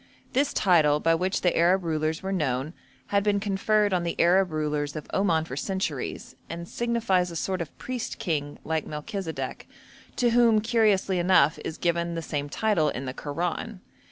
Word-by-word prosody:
This 280 +2 +2
title, 155 -6 +4
by 165 +2 +3
which 185 +3 0
the 180 - +2
Arab 180 +3 +3
rulers 160 0 -1
were 190 - -2
known, 150 -4 -1 0.4
had 200 -1 +2
been 205 -1 +2
conferred 205 +1 +1
on 180 - +2
the 170 -1 -3
Arab 185 +2 +4
rulers 150 -1 -2
of 155 - -5
Oman 170 -5 +2
for 130 - -6
centuries, 150 -6 -3
and 170 +1 -6
signifies 225 -7 0
a 170 - -8
sort 185 +2 -2
of 160 - -7
priest 255 -3 -4
king, 145 -4 -2
like 160 -1 -2
Melchisedek, 160 +3 -5 0.5
to 240 -1 +2
whom, 230 -2 +5
curiously 210 -4 +2
enough, 175 -5 +4
is 160 - -5
given 170 0 0
the 165 - -3
same 145 -2 -3
title 175 -5 +1
in 135 -1 -4
the 130 - -4
Koran. 175 +9 -4
175 Hz, 175 wpm, -26 LUFS, 155-200 Hz, 0.5 s, whom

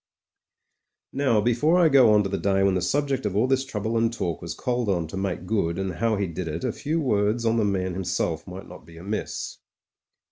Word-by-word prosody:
• - - -3
.•••• - - 0
Now, 115 -5 +4
before 120 +10 +2
I 175 -2 +5
go 135 -6 +6
on 105 -1 +5
to 95 - -3
the 100 - -2
day 95 -1 +2
when 100 -1 +3
the 90 - 0
subject 135 +7 0
of 100 - -4
all 110 +4 +3
this 135 0 +1
trouble 115 -2 -2
and 115 0 +2
talk 85 -8 -3
was 85 -1 -5
called 120 -4 -1
on 85 -4 0
to - - -7
make 95 -2 -3
good, 90 -5 0
and 95 -1 -2
how 110 +6 0
he 100 -1 -1
did 85 0 -5
it, 80 +2 -4
a - - 0
few 155 +3 -2
words 115 -4 +1
on 115 0 +2
the 110 - +2
man 95 -2 -1
himself 90 -3 -2
might 95 +1 -8
not - - -12
be 85 +2 -15
amiss. 100 +6 -5
100 Hz, 240 wpm, -25 LUFS, 90-120 Hz, -, go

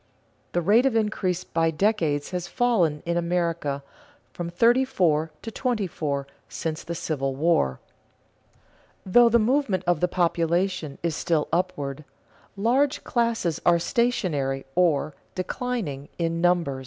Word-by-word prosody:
The 175 - +1
rate 225 +9 +5
of 255 - 0
increase 195 -5 0
by 165 -2 0
decades 160 -4 0
has 180 -1 -3
fallen 190 - +1
in 170 0 0
America 170 -5 -1 0.5
from 175 -1 -4
thirty 235 +9 +4
three 170 - +1 0.2
to 225 - -5
twenty 235 -4 -1
four 145 -5 -3 0.2
since 160 -1 -4
the 170 - -5
Civil 135 -5 -2
War. 150 - +1 1.3
Though 235 +5 +6
the 235 - +5
movement 230 -5 +1
of 175 -3 +2
the 180 - +2
population 170 -2 0
is 170 -3 0
still 165 -3 0
upward, 155 -6 -2 0.5
large 260 +7 +1
classes 230 -9 0
are 175 -1 +5
stationary 170 - 0
or 155 -4 +2 0.2
declining 185 - -3
in 165 0 -1
numbers. 170 -6 +2
175 Hz, 130 wpm, -25 LUFS, 155-215 Hz, 1.3 s, Though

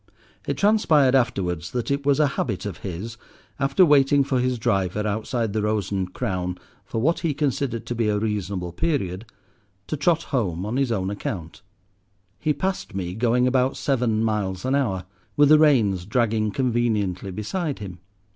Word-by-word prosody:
It - - -1
transpired 160 -11 +4
afterwards 90 -9 0
that 125 +1 -3
it 140 0 -1
was 140 0 +3
a 150 - +5
habit 110 -8 -3
of 100 -5 -4
his, 100 +5 -6 0.4
after 135 +7 +4
waiting 145 -2 +4
for 130 -1 0
his 125 0 0
driver 105 -3 0
outside 110 +1 -2
the 110 - 0
Rose 105 -2 -1
and 95 -2 -2
Crown 90 -6 -3 0.3
for 115 - -3
what 160 +9 +2
he 155 -4 -1
considered 135 -5 -1
to - - -3
be 115 -2 0
a 105 - +1
reasonable 100 -4 -2
period, 95 - -2 0.6
to - - -3
trot 165 +3 +2
home 95 -8 0
on 110 +5 -2
his 135 -3 +1
own 95 -3 -1
account. 90 -4 -5 0.8
He 150 - +1
passed 150 - -3
me 90 -2 -3
going 120 +3 +2
about 130 +1 +1
seven 120 -5 +1
miles 100 -4 -1
an 130 - +1
hour, 100 -10 0 0.3
with 145 -1 +6
the 155 0 +7
reins 105 - +3
dragging 110 -1 +1
conveniently 110 -6 0
beside 140 - -3
him. 95 -4 -8
115 Hz, 170 wpm, -24 LUFS, 100-135 Hz, 0.8 s, the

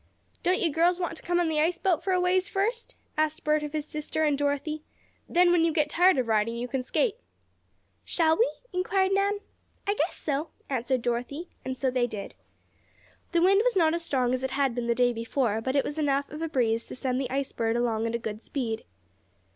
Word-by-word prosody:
"Don't 365 +1 +2
you 330 - +1
girls 345 +4 +3
want 345 -2 -2
to - - -13
come 350 0 0
on 345 - +2
the 315 -1 0
ice 340 +3 +1
boat 355 -3 +1
for 380 - 0
a 365 - +3
ways 365 +2 +2
first?" 435 +4 -1 0.2
asked 310 +2 0
Bert 305 0 +2
of 295 -1 -4
his 305 -1 -2
sister 305 +1 -2
and 300 -2 +3
Dorothy. 290 +2 -1 0.5
"Then, 350 0 +5
when 345 -2 +4
you 330 - +3
get 300 -2 +1
tired 360 -2 +5
of 250 -3 0
riding, 220 +1 +1
you 240 +1 -3
can 265 +1 -2
skate." 435 - 0 0.9
"Shall 320 -2 +2
we?" 465 +6 +3 0.2
inquired 380 +1 +1
Nan. 400 +1 +1 0.4
"I 405 - +2
guess - - -1
so," 295 +2 -2 0.2
answered 255 -1 0
Dorothy, 250 +8 -2
and 260 0 -4
so 260 -1 0
they 250 -1 +1
did. 210 -4 -6 1.0
The 340 -1 +3
wind 390 +2 +5
was - - +2
not 325 -4 +4
as 340 0 -2
strong 255 -6 +1
as 255 - -1
it 265 - -1
had 270 -1 +1
been 240 0 -3
the 235 - +2
day 245 0 +3
before, 230 -1 -1
but 260 +4 -2
it 280 - +3
was 295 +2 -3
enough 280 -1 0
of 300 +2 -7
a 325 - -2
breeze 230 -5 +1
to - - -7
send 255 0 -1
the 260 - -3
Ice 270 +1 -2
Bird 225 0 -1
along 230 -2 0
at 230 - -2
a - - +2
good 220 -2 -5
speed. 235 -6 -3
295 Hz, 225 wpm, -27 LUFS, 250-350 Hz, 1.0 s, Then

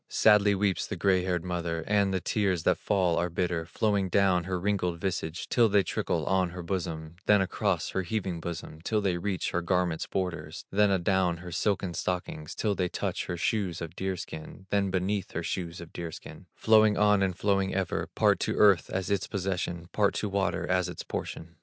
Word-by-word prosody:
Sadly 105 -1 +5
weeps 95 -3 0
the 105 - -4
gray 95 0 +2
haired 90 -2 -1
mother, 85 -2 -2
And 100 -2 +2
the 95 - 0
tears 95 -3 0
that - - +2
fall 90 -5 +1
are 90 - +1
bitter, 85 -1 -1
Flowing 100 0 0
down 95 -3 +3
her 90 -1 -2
wrinkled 90 -3 -1
visage, 85 -3 -3
Till 115 -2 +4
they 100 -1 +4
trickle - - -1
on 95 -1 +2
her 90 0 -7
bosom; 85 -3 -4
Then 105 -1 +6
across 95 - 0
her 95 - 0
heaving 95 -2 -3
bosom, 80 -1 -6
Till 110 +5 0
they 95 -4 0
reach 95 -1 -2
her 90 - 0
garment's 85 -1 0
border; 85 -5 -3 0.2
Then 105 +1 +4
adown 95 -2 +2
her 90 +1 -9
silken 95 0 0
stockings, 85 -3 -3
Till 105 -2 0
they 90 -2 -1
touch - - -3
her 90 - -3
shoes 90 -1 -1
of 85 -2 -7
deer 95 -1 -2
skin; 80 +5 -8
Then 100 -1 +2
beneath 95 +1 -1
her 80 - -2
shoes 85 -1 -4
of 85 -1 -10
deer 85 -1 -5
skin, - - -11
Flowing 110 -1 +5
on 105 -1 +4
and 95 -2 0
flowing 95 -2 +1
ever, 95 -2 -1
Part - - +3
to - - -1
earth 100 -4 +5
as 95 +1 -2
its 100 -2 0
possession, 90 -3 -3
Part 105 -2 +2
to 105 - -1
water 95 -2 0
as 90 -1 +1
its - - -6
portion. 85 0 -6
95 Hz, 200 wpm, -28 LUFS, 85-100 Hz, 0.2 s, Then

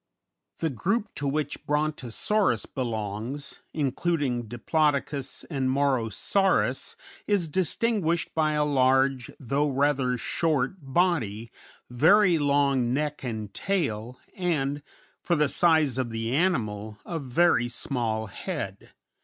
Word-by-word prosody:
] - - -56
The 160 -2 +1
group 205 - -1
to 145 - -3
which 145 0 -2
Brontosaurus 150 - 0
belongs, 115 +2 -4
including 140 -4 -1
Diplodocus 140 +3 -1
and 135 -5 -1
Morosaurus, 135 - +1 0.3
is 200 -5 +2
distinguished 185 +1 0
by 155 -1 +1
a 150 0 +2
large, 135 -2 +2
though 140 +3 0
rather 135 -2 +1
short, 150 +4 0
body, 135 - 0 0.4
very 170 - +4
long 140 -4 +2
neck 150 0 -2
and 110 -5 -5
tail, 125 - -2 0.2
and, 145 -6 -1 0.4
for 170 - +1
the 150 -1 +3
size 155 -5 +3
of 125 -2 -1
the 115 +1 -3
animal, 110 - 0
a 165 - -3
very 135 -2 +2
small 115 -3 -2
head. 95 - -6
140 Hz, 110 wpm, -27 LUFS, 120-160 Hz, 0.4 s, very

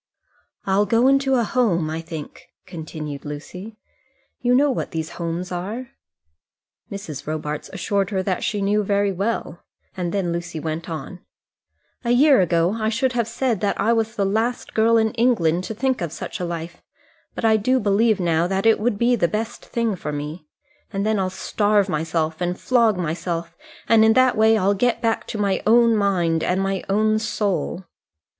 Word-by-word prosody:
"I'll 195 +2 +2
go 230 +5 +3
into 270 0 +3
a 240 - +2
home, 210 -9 +1
I 160 +1 -3
think," 160 -2 -9 0.2
continued 155 -3 -7
Lucy. 180 +9 -8 0.6
"You 245 0 +3
know 285 +2 +4
what - - -3
those 160 0 -3
homes 170 +1 -4
are?" 210 +8 -5 1.0
Mrs. 155 -8 -7
Robarts 150 -1 -4
assured 195 0 -1
her 190 -3 -1
that 185 -1 -2
she 205 -2 -1
knew 205 +2 +2
very 200 0 +1
well, 195 -3 -3 0.3
and 175 -2 -3
then 190 -3 -1
Lucy 170 -1 -4
went 160 +2 -4
on: 160 +3 -6 0.8
"A 235 - -2
year 265 0 +5
ago 170 +1 +2
I 215 0 0
should 250 +3 0
have 235 -2 0
said 230 -3 -1
that 205 - 0
I 220 +4 +3
was 225 -1 -1
the 200 - 0
last 225 +5 -1
girl 230 +1 +4
in 220 -1 +2
England 185 -8 +1
to 220 - -5
think 260 +1 0
of 170 -3 -3
such - - -6
a 180 - -2
life, 170 0 -6 0.5
but - - -3
I 220 -1 +5
do 255 +5 +2
believe 215 +1 +2
now 170 -1 +1
that 195 +2 -1
it 225 -1 +5
would 215 -1 0
be 240 +3 +3
the 185 -7 +2
best 220 +4 -4
thing 230 -3 -1
for 150 -4 -5
me. 150 +2 -6 0.4
And 200 -1 -2
then 215 -1 +1
I'll 185 -1 0
starve 205 +1 +1
myself, 160 -1 -2
and 180 +1 -1
flog 230 -5 +3
myself, 170 0 -3 0.3
and 225 -1 +5
in 220 0 +5
that 255 0 +4
way 220 +1 +4
I'll 200 0 +2
get 235 +4 +1
back 230 -1 -1
my 200 -2 0
own 230 0 +5
mind 175 -6 +1
and 180 +1 0
my 195 -1 -1
own 215 +2 +2
soul." 200 -4 -2
200 Hz, 180 wpm, -22 LUFS, 170-225 Hz, 1.0 s, year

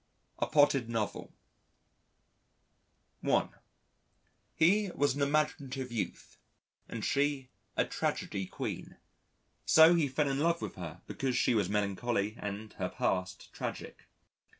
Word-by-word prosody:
A - - +1
Potted 140 -5 +4
Novel 110 -3 -3 1.9
(1) - - +2 1.1
He 195 +5 +4
was 145 -1 +2
an 145 - -4
imaginative 140 -3 0
youth, 115 - -5 0.5
and 115 -2 -4
she 140 -2 0 0.3
a - - +3
tragedy 95 -1 -2
queen. - - -5 0.7
So 160 +2 +7
he 165 -4 +3
fell 140 +2 0
in 135 0 0
love 170 +2 +2
with - - -5
her 90 -3 -8
because 130 -2 -2
she - - +3
was 105 -5 +1
melancholy 105 +1 0
and 105 +1 -5
her 90 -1 -1
past 90 0 -2
tragic. - - -6
130 Hz, 120 wpm, -32 LUFS, 105-145 Hz, 1.9 s, So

